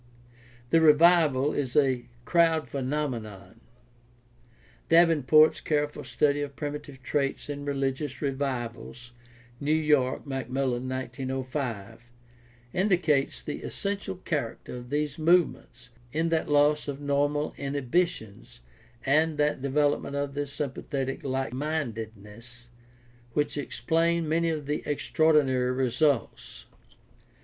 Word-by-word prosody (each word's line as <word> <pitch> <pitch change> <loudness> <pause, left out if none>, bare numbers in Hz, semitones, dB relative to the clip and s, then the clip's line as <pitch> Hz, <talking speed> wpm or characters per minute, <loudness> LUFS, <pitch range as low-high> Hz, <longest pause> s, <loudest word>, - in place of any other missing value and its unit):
The 165 - +5
revival 155 -3 +5
is 130 -4 -2
a 130 -4 +2 0.2
crowd 165 -1 +3
phenomenon. 120 -8 -4 1.3
Daven 165 -5 +4
port's 155 0 +6
careful 150 -1 -1
study 145 -1 +1
of 140 -1 -5
Primitive 145 -3 -6
Traits 140 +1 -1
in 145 0 -5
Religious 135 0 -2
Revivals 120 -4 -4 0.5
(New 145 +1 -1
York: 150 -5 +1
Macmillan, 130 -1 -2
1905) 130 -4 -4 0.6
indicates 175 -7 +1
the 150 - -5
essential 200 -2 -3
char 145 -9 -1
acter - - -7
of 120 0 -9
these 150 +1 -2
movements 155 -7 +1 0.2
in 160 +4 0
that 160 -2 0
loss 150 +1 +3
of 140 -1 -4
normal 145 +1 0
inhibitions 140 - -2 0.4
and 155 +3 +2
that 150 -2 +1
development 140 +1 0
of 140 0 -2
the 145 0 -2
"sympathetic 135 -1 -4
likemindedness" 120 -4 -4 0.6
which 150 0 0
explain 165 +4 0
many 165 +2 +1
of 155 -3 -3
the 150 +1 -2
extraordinary 145 -4 +2
results. 130 - -1
145 Hz, 105 wpm, -27 LUFS, 130-150 Hz, 1.3 s, port's